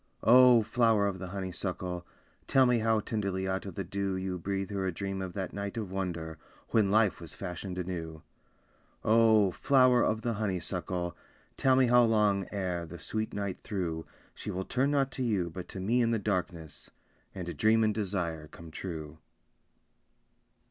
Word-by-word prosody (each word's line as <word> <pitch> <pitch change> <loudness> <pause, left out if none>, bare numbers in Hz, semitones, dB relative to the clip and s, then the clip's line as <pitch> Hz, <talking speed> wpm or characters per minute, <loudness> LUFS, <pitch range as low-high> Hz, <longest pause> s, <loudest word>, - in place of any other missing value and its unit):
Oh, 125 -1 +7
flower 110 -1 +3
of 100 -2 -2
the 95 - -5
honeysuckle, 90 -1 -4 0.4
Tell 135 -1 +5
me 125 -1 +3
how 110 -1 +2
tenderly 100 -3 -2
out 95 +1 -2
of 95 - -7
the 100 - -3
dew 100 +1 -2
You 95 -1 -3
breathe 95 +2 -3
her 95 -1 -1
a - - 0
dream 95 +2 -4
of 95 -2 -5
that 95 -1 -4
night 100 +2 -4
of 105 -5 -4
wonder 85 -4 -4 0.3
When 110 -3 +3
life 105 -2 +3
was 85 - -8
fashioned 90 +1 -6
anew. 85 -3 -5 0.8
Oh, 110 -3 +5
flower 130 +3 +4
of 110 +1 0
the 120 - 0
honeysuckle, 90 -3 -2 0.4
Tell 130 -1 +3
me 130 0 +5
how 125 0 +6
long 105 -4 +2
ere, 90 -4 -2
the 85 - -9
sweet 110 +5 -3
night 100 -2 -3
through, 85 -5 -4 0.3
She - - -7
will 95 +1 -3
turn 130 +3 +1
not 140 -2 +1
to 130 0 -3
you 100 -8 0
but 90 +1 -7
to 95 - -6
me 115 +7 +2
in 115 - +2
the 115 - +2
darkness, 90 -6 -3 0.5
And 90 -2 -5
dream 110 +1 +4
and 110 -1 +2
desire 90 -7 -3
come 80 +1 -12
true. 80 -3 -6
95 Hz, 175 wpm, -30 LUFS, 90-110 Hz, 0.8 s, Oh